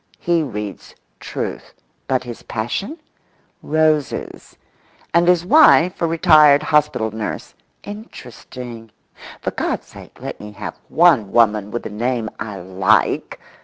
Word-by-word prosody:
He 170 -1 +1
reads 105 -8 -6 0.2
Truth. - - -6 0.3
But 130 -1 0
his 120 -2 -8
passion? 120 - -4 0.6
Roses—and 155 +2 -2
his 175 -1 +3
wife 185 - +5
a 170 - +2
retired 155 -3 +5
hospital 150 -8 +1
nurse—interesting—for 120 - -9
God's - - -3
sake - - -14
let - - -7
me 105 0 -10
have 105 +1 -7
one 155 - +4
woman 105 -3 +2
with 120 - -5
a - - -5
name 115 +1 -2
I 105 -3 -6
like! 95 +4 +1
125 Hz, 110 wpm, -19 LUFS, 110-165 Hz, 0.6 s, wife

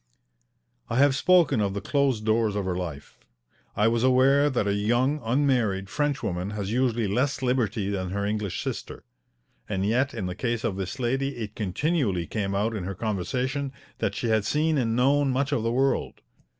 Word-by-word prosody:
I 115 - -1
have 140 +1 +5
spoken 150 -4 +4
of 100 -1 -1
the - - -1
closed 130 -1 0
doors 110 -1 +2
of 100 -2 -1
her 90 -1 -1
life. 85 -6 -6 0.6
I 105 - +3
was 115 0 +1
aware 135 +3 +4
that 125 -6 0
a 100 - +1
young, 120 +8 +1
unmarried 115 -6 +1
Frenchwoman 130 -11 -1
has 100 -1 -3
usually 120 -2 +1
less 130 +7 0
liberty 115 -5 0
than 95 -2 -2
her 100 +2 -2
English 105 -2 -2
sister. - - -5 0.7
And 95 -2 -1
yet 125 +6 +1
in 105 -5 -3
the 90 - -3
case 115 +2 -2
of 110 -5 -1
this 95 +5 -4
lady 135 +2 -1
it 110 -3 -5
continually 105 - 0
came 100 +1 -2
out 110 +3 0
in 100 - -4
her 95 +2 -4
conversation 125 +8 -2 0.3
that - - -1
she 120 - -2
had 110 -2 +2
seen 155 +4 +1
and 115 -2 0
known 140 +3 +3
much 135 +2 0
of 140 - +1
the 115 +1 0
world. 135 +3 0
115 Hz, 185 wpm, -26 LUFS, 100-135 Hz, 0.7 s, have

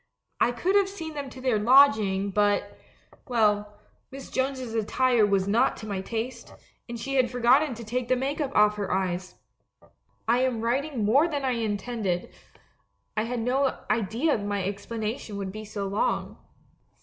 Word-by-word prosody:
I - - +3
could 360 +11 0
have 400 -1 +4
seen 325 -5 -7
them 285 -2 -5
to 260 - -11
their 255 -4 +1
lodging, 215 -5 +4
but 205 0 +1 0.3
— - - -28
well, 210 -4 +1 0.3
Miss 270 0 -10
Jones's 260 -3 -2
attire 230 +1 +2
was 195 -1 +1
not 230 +6 +2
to 220 - -8
my 200 -3 -3
taste, 230 +3 -5 0.3
and 235 -1 -5
she 275 +3 -2
had 255 -2 +3
forgotten 250 +3 +3
to 230 - -8
take 240 +2 -3
the 255 - +3
make 275 +4 -2
up 285 - -1
off 210 0 +4
her 200 -2 -3
eyes. 185 -1 -2 0.9
"I 235 +2 +3
am 255 -3 0
writing 250 0 -1
more 275 +10 +4
than 290 -4 -3
I 260 - +1
intended; 215 -4 -2 0.8
I 215 - 0
had 240 0 -3
no 260 +3 +1
idea 230 - +1
that - - -6
my 205 -1 -2
explanation 210 +2 -4
would 195 -1 -4
be 215 +2 -8
so 205 -1 -4
long! 200 +2 -1
230 Hz, 175 wpm, -26 LUFS, 205-260 Hz, 0.9 s, have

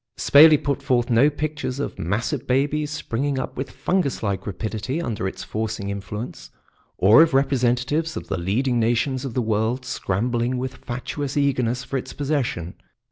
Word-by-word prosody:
Spayley 155 +2 +7
put 140 0 -2
forth 125 -2 +1
no 120 +6 +5
pictures 150 -3 -3
of 145 - -4
massive 120 - -2
babies 145 +3 +1
springing 140 -1 -2
up 130 - -4
with 135 +1 -4
fungus 180 -11 -1
like 100 -1 -2
rapidity 110 - -3
under 110 - -2
its - - -6
forcing 110 -2 -3
influence, 105 +4 -6 0.5
or 105 - +7
of 160 -4 +4
representatives 135 +4 +1
of - - -6
the - - -2
leading 120 +8 0
nations 125 +4 0
of 125 - -5
the 125 - +1
world 110 +4 0
scrambling 120 +2 -1
with 130 +1 -4
fatuous 130 +3 -4
eagerness 125 -3 +1
for 135 +2 -3
its 130 - -6
possession. 135 - -2
125 Hz, 160 wpm, -23 LUFS, 115-140 Hz, 0.5 s, Spayley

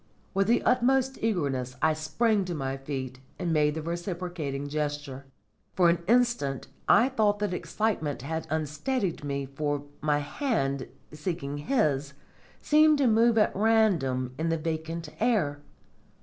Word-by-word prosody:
With 195 0 +2
the 235 - +3
utmost 265 +1 +2
eagerness 140 - -1
I 155 - +3
sprang 195 +8 +1
to 175 -1 -3
my 135 -2 -2
feet 135 -2 -5 0.2
and 175 -3 -1
made 150 -1 +2
the 160 - -4
reciprocating 170 -4 -4
gesture. 145 -2 -3 0.5
For 180 -2 +5
an 170 0 -1
instant 235 - +2 0.2
I 240 - +6
thought 215 -5 +2
that 205 -2 -2
excitement 180 - -2
had 160 +2 -4
unsteadied 160 - -2
me, 140 -1 -2
for 145 +1 -2 0.2
my 150 -1 +2
hand, 145 - -1 0.2
seeking 150 -2 -4
his, 145 - 0 0.5
seemed 305 0 +5
to 280 - +2
move 230 0 +4
at 210 - +3
random 180 - +2
in 165 +1 0
the 165 - +1
vacant 160 0 -4
air. 200 -12 +1
160 Hz, 140 wpm, -28 LUFS, 145-215 Hz, 0.5 s, I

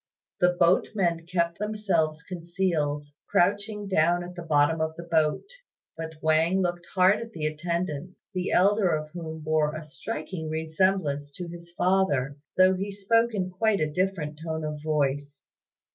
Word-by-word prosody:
The 180 0 +4
boatmen 170 -1 +2
kept 170 -1 0
themselves 195 -7 0
concealed, 170 -4 -1 0.2
crouching 205 +3 +1
down 175 -1 +2
at 180 +1 -8
the 175 - -7
bottom 155 0 +2
of 160 0 -1
the 170 - -7
boat; 160 -2 +1 0.5
but 160 0 -6
Wang 160 +4 +3
looked 175 -1 -2
hard 185 +2 +5
at 230 -1 -8
the 155 -2 -3
attendants, 170 +1 -3 0.2
the 185 0 -1
elder 200 +1 +4
of 155 0 -7
whom 160 -2 -6
bore 155 0 +1
a 155 - -5
striking 160 0 -5
resemblance 160 -2 0
to 175 +2 -6
his 170 0 -10
father, 175 -8 +1 0.2
though 185 0 +6
he 195 +2 -3
spoke 230 +3 +2
in 185 -2 -1
quite 210 +2 +1
a 155 -1 0
different 165 -4 -1
tone 160 -1 -3
of 150 -1 -4
voice. 145 -2 -1
170 Hz, 155 wpm, -27 LUFS, 155-185 Hz, 0.5 s, though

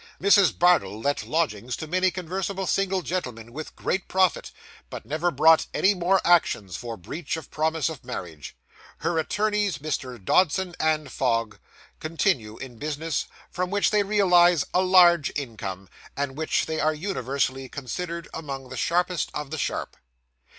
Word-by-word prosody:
Mrs. 200 -1 +4
Bardell 170 - +3
let 140 +5 -1
lodgings 125 -7 -1
to - - -6
many 185 +4 +2
conversable 190 +2 -3
single 190 +1 0
gentlemen, 120 -11 -4
with 155 +3 -7
great 190 - -2
profit, 185 -1 +1 0.4
but - - -8
never 160 +4 0
brought 160 +1 +5
any 200 - +4
more 185 +1 +2
actions 110 - +2
for 115 +2 -6
breach 150 - -5
of 160 - -10
promise 160 0 0
of 160 -5 -6
marriage. 85 - -7 0.5
Her 165 +1 0
attorneys, 205 -1 0
Messrs. 130 -5 -4
Dodson 180 - +2 0.3
& - - -11
Fogg, 115 -5 -1 0.4
continue 155 - -1
in 125 -4 -9
business, 155 +1 -2 0.2
from 180 0 -2
which 205 +1 +1
they 210 -1 +3
realise 180 -5 +4
a 180 - +4
large 175 -5 +5
income, 105 -8 -5 0.3
and 140 -1 -1
in - - -15
which 155 +1 0
they 160 0 -3
are 155 0 +1
universally 135 - -2
considered 170 +5 -5
among 135 -5 -6
the - - -7
sharpest 180 0 0
of 150 -1 -5
the 160 - -3
sharp. - - -3
160 Hz, 155 wpm, -25 LUFS, 135-180 Hz, 0.5 s, brought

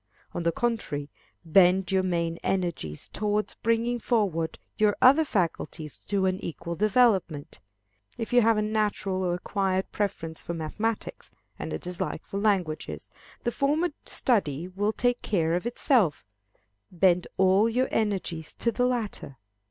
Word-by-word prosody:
On - - -2
the 170 0 +2
contrary, 165 -10 -2 0.3
bend 180 +3 +4
your 190 -1 +3
main 170 -2 -1
energies 170 - -2
towards 210 0 -1
bringing 230 +2 +1
forward 190 -10 0 0.2
your 210 -1 +2
other 275 +5 +7
faculties 165 - -2
to 195 -2 -1
an 185 0 0
equal 170 +1 -5
development. 200 -8 +2 0.6
If 230 0 -4
you 245 - +7
have 225 -1 +4
a 215 - +1
natural 210 -3 0
or 175 -1 0
acquired 190 +1 -1
preference 165 -6 -3
for 170 - -5
mathematics, 210 +8 -3 0.3
and - - -4
a - - -1
dislike 180 -2 -4
for 200 - -4
languages, 190 -7 -1 0.3
the 240 - 0
former 300 +7 +1 0.2
study 175 - +1
will 200 +3 -1
take 245 +2 0
care 165 -5 +1
of 180 +6 -1
itself: 235 - +2 0.7
bend 180 0 +3
all 190 +4 +4
your 250 +3 +1
energies 190 -7 -2
to 235 - +1
the 250 +1 +1
latter. 225 - -3
195 Hz, 145 wpm, -27 LUFS, 170-225 Hz, 0.7 s, other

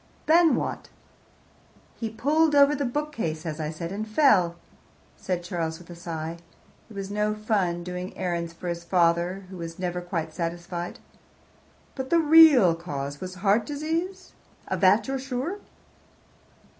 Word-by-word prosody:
"Then 330 0 +5
what?" - - -4 1.1
"He 225 - -4
pulled 295 +7 +2
over 285 0 +6
the 285 -1 -1
bookcase, 240 - -3
as 160 -1 -4
I 155 -1 -2
said, 165 +2 -6
and 215 +2 -4
fell," 215 - +4 0.6
said 180 -2 -3
Charles, 165 -3 -3
with 175 0 -14
a - - -8
sigh. 165 -1 -5 0.5
It 220 - -13
was 195 0 -5
no 210 +1 0
fun 195 -5 0
doing 180 +1 -6
errands 170 -2 -2
for 170 +2 -9
his 170 0 -3
father, 175 +2 +1
who 190 - -8
was 165 -1 -7
never 180 -1 -3
quite 165 -3 -4
satisfied. 175 +1 -4 1.0
"But 265 -1 -5
the 340 - +4
real 310 - +7
cause 145 -4 -5
was 185 0 -6
heart 205 +3 +4
disease? 330 +6 -3 0.4
Of 190 -1 -2
that 200 +3 +4
you're 270 0 -2
sure?" 270 +9 -4
185 Hz, 150 wpm, -26 LUFS, 170-265 Hz, 1.1 s, real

